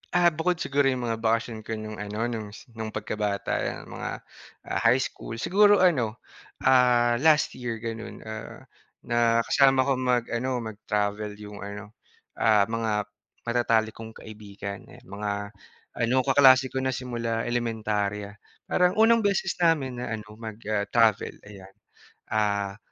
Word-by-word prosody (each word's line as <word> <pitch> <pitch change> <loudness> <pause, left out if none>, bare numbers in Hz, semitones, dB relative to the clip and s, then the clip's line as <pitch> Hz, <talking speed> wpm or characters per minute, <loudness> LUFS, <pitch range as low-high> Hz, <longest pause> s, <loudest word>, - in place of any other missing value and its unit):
Ah, 175 -1 +5
bukod 165 +3 0
siguro 140 -3 +1
yung 130 -2 0
mga 115 -1 -2
bakasyon 115 0 0
ko 115 - -2
nung 110 0 -7
ano, 105 +2 -3
nung 110 -2 -4 0.2
nung 110 -1 -6
pagkabata, 105 -1 -2
yan, - - -5
mga - - -6 0.6
high 125 +3 +4
school, 115 - -6
siguro 205 - +4
ano, 125 -12 +2 0.5
ah, 120 -2 +4
last 155 +1 +4
year 120 -2 -3
gano'n, 115 0 -7
ah, 110 0 -8 0.4
nakasama 120 +3 +3
ko 135 - 0
mag-ano, 125 0 0
mag-travel 105 -1 -3
yung 105 -1 -9
ano, 100 +1 -8 0.5
ah, 105 -2 +5
mga 115 -1 -1 0.5
matatalik 115 -2 +1
kong 110 0 -9
kaibigan, 100 -2 -9
ayan, - - -15
mga 100 +2 -4 0.7
ano, 115 +2 +1
kaklase 130 -1 +5
ko 135 - -2
na 130 -1 -1
simula 115 -3 -3
elementarya. 105 -4 -2 0.3
Parang 180 0 +2
unang 225 +1 +5
beses 200 -4 0
namin 145 -8 +1
na 125 - -4
ano, 110 - -8
na 105 +1 -15 0.2
mag-travel, 110 0 +1
ayan, 95 -2 -13 0.6
ah, 100 -2 0
115 Hz, 135 wpm, -26 LUFS, 105-130 Hz, 0.7 s, Ah